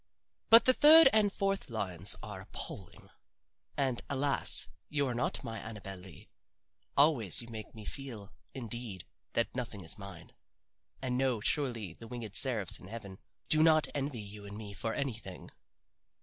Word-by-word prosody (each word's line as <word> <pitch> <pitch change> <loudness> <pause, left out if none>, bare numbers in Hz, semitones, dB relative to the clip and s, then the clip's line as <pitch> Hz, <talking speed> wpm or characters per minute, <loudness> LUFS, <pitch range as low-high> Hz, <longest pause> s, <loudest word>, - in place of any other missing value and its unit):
But 230 +1 +8
the 255 - +6
third 310 +1 +9
and 210 -2 +4
fourth 195 -5 -2
lines 100 -4 -2
are 105 -3 -7
appalling. - - -8 0.7
And, 130 -4 0
alas, 140 0 +4 0.2
you 145 -2 0
are 125 - -2
not 120 +1 -2
my 115 -1 -5
Annabel 100 -3 -7
Lee. 90 -4 -11 0.7
Always 135 - +4
you - - -12
make 110 -1 -8
me 110 -1 -10
feel, 115 -8 -7 0.2
indeed, 115 -7 -6 0.3
that 115 - 0
nothing 120 -5 -4
is 80 - -2
mine. 95 -4 -10 0.7
And 125 -1 -1
no, 130 -4 +1
surely 115 - -1
the 115 - -12
winged 115 -3 -7
seraphs 120 -7 +2
in 95 - -12
heaven 100 -3 -9 0.3
do 155 - +5
not 155 -1 +5
envy 135 -5 -3
you 105 0 -9
and 100 0 -8
me 105 -2 -7
for 115 +3 -3
anything." 115 -9 -5
115 Hz, 155 wpm, -32 LUFS, 100-140 Hz, 0.7 s, third